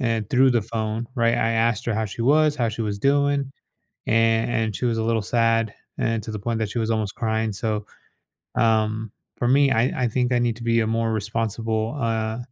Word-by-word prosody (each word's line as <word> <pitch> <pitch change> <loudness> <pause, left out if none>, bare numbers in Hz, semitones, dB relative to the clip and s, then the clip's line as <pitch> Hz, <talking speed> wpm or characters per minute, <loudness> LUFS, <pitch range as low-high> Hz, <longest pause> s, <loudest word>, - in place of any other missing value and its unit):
and 115 -4 -1
through 130 -1 +5
the 120 -3 +2
phone, 110 +1 -3
right, 115 -2 +2
I 115 -1 +1
asked 115 0 +1
her 115 - 0
how 110 - 0
she 110 +3 -5
was, 150 +3 +3
how 120 -2 +1
she 110 +1 -4
was 100 -1 -3
doing, 140 +1 +1 0.6
an 115 +1 +3
and 110 -2 -1
she 125 - -2
was 115 -2 +1
a 110 - 0
little 115 -1 +1
sad 115 0 +1 0.2
and 115 -1 -1
to 110 - -6
the 105 - -5
point 115 +2 -2
that 110 -2 -1
she 120 - -3
was 110 0 -1
almost 110 -3 -1
crying. 110 -1 -1
So, 105 0 -2 0.7
um, 110 -1 +1 0.3
for 120 - 0
me, 140 +1 +4
I 115 +2 +3 0.2
I 120 - +2
think 125 +2 0
I 125 - +3
need 120 -2 0
to 120 - -9
be 115 0 +2
a 110 - +1
more 115 0 0
responsible, 110 +2 -2
uh, 110 -2 -1
115 Hz, 220 wpm, -23 LUFS, 110-120 Hz, 0.7 s, through